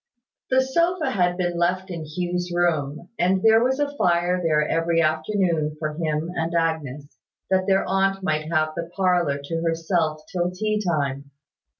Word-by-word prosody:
The 260 0 +4
sofa 335 +5 +1
had 180 -2 +1
been 175 -2 -1
left 185 +2 0
in 165 -2 -5
Hugh's 175 +3 -3
room, 170 -2 -1
and 185 +2 +2
there 225 +1 +6
was 265 +2 +1
a 290 0 -1
fire 175 -1 +2
there 155 -3 +2
every 165 0 +1
afternoon, 160 -1 0
for 155 -1 -3
him 155 +1 -2
and 165 -1 -2
Agnes, 150 -4 -2 0.3
that 190 0 +2
their 195 -1 +3
aunt 195 0 +1
might 155 -2 -1
have 155 -1 +2
the 170 0 -4
parlour 180 -7 +2
to 165 +3 -3
herself 165 -1 0
till 175 -2 0
tea 210 +3 -1
time. 140 -5 -1
175 Hz, 165 wpm, -23 LUFS, 155-190 Hz, 0.3 s, there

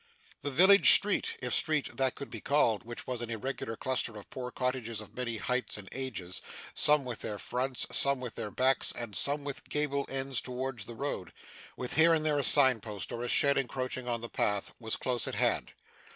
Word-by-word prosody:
The 145 - -3
village 190 +8 +6
street 455 - +1
if - - -2
street 155 -3 +1
that 130 -1 +1
could 140 - -9
be - - -7
called 120 -8 +1
which 120 +1 -8
was 125 -2 -4
an 120 - -5
irregular 115 0 -5
cluster 125 -4 -2
of 105 - -12
poor 125 -1 -6
cottages 125 -3 -3
of 110 - -10
many 120 -3 -3
heights 125 +3 -1
and 100 -2 -8
ages, 110 -9 -4 0.3
some 150 -2 +4
with 120 -3 -5
their 105 -2 -5
fronts, 125 +4 -1
some 140 -1 +3
with 125 -3 -6
their 105 - -5
backs, 130 +4 +2
and 115 -4 -5
some 145 +1 +3
with 140 -1 -7
gable 145 -2 -1
ends 135 -1 -1
towards 125 -3 -5
the 120 - -9
road, 115 -8 -5 0.5
with 125 +3 -4
here 165 +1 +6
and 155 -1 -2
there 150 -2 +1
a - - 0
signpost, 115 -9 +5
or 120 - -5
a - - -3
shed 140 +2 +2
encroaching 130 -1 -4
on 120 -1 -2
the 120 - -5
path 105 -3 -2
was 110 -2 -2
close 125 -2 0
at - - -4
hand. - - +1
130 Hz, 205 wpm, -30 LUFS, 115-140 Hz, 0.5 s, village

